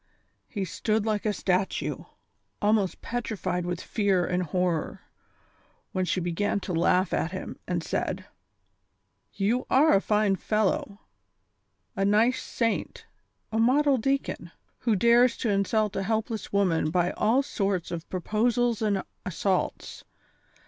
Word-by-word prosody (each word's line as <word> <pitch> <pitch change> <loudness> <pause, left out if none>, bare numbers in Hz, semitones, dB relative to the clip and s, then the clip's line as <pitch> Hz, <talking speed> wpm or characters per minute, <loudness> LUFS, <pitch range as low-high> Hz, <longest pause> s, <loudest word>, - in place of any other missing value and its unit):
He 200 -4 -3
stood 215 +4 -1
like 215 -1 0
a - - +3
statue, 190 -1 -1 0.5
almost 205 -2 +1
petrified 185 -7 -3
with 175 -1 -2
fear 195 -5 +1
and 180 0 0
horror, 180 -1 -1 0.9
when 185 0 0
she 185 - 0
be 175 0 -2
gan 205 +4 0
to 185 - -4
laugh 180 +2 +2
at 170 - -1
him, 185 - -6
and 175 -2 -1
said: - - -2 1.1
"You 220 +6 0
are 295 +4 +5
a 195 - +4
fine 210 -2 +2
fellow, 210 0 -1 0.9
a 195 - 0
nice 215 +5 +3
saint, 230 -2 -2 0.5
a 220 - 0
model 270 +4 +4
deacon, 270 +4 -1 0.3
who 230 -3 +1
dares 235 +4 +4
to 230 - -1
insult 205 +1 +1
a - - 0
helpless 220 +2 -2
woman 185 -6 +2
by 175 +1 +1
all 235 +6 +2
sorts 195 - -2
of 165 -1 -6
pro 185 - -3
posals 235 +2 +1
and 205 -3 +1 0.2
assaults. 185 0 -2
205 Hz, 135 wpm, -27 LUFS, 185-225 Hz, 1.1 s, are